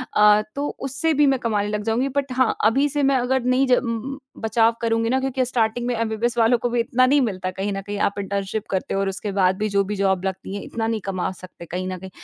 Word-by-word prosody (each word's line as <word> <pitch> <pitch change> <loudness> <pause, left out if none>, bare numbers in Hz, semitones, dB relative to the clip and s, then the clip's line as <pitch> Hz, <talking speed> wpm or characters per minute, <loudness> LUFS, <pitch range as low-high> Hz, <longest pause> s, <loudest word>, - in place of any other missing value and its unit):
अ, 210 0 +6
तो 285 +1 -1
उससे 270 +4 -1
भी 295 0 +4
मैं 270 -2 +2
कमाने 210 -3 0
लग 210 0 -2
जाऊँगी 235 +5 0
बट 275 -2 0
हाँ, 255 0 +2
अभी 270 +6 +4
से 290 0 -1
मैं 270 0 +3
अगर 255 0 0
नहीं 255 +2 +2
ज 250 - +6 0.6
बचाव 225 +1 +2
करुँगी 230 0 +1
ना 260 - +2
क्योंकि 265 -1 0
स्टार्टिंग 240 -1 0
में 245 - 0
एमबीबीएस 230 +1 -1
वालों 230 +1 +4
को 245 - -2
भी 240 0 0
इतना 255 +1 +3
नहीं 280 +2 +4
मिलता 185 -5 -2
कहीं 195 +2 -3
न 195 - -3
कहीं 205 +1 -5
आप 200 - -5
इंटर्नशिप 200 +2 -3
करते 190 -1 -2
हो 195 - 0
और 195 - 0
उसके 200 +1 -4
बाद 190 -1 +2
भी 215 0 -1
जो 200 0 +2
भी 205 +2 -4
जॉब 190 -1 +1
लगती 190 +1 -4
है, 200 - -4
इतना 225 -1 -3
नहीं 225 -2 -1
कमा 185 -1 -2
सकते 175 -1 -11
कहीं 180 +3 -4
न 185 - -4
कहीं 190 0 -9
225 Hz, 255 wpm, -22 LUFS, 200-255 Hz, 0.6 s, अ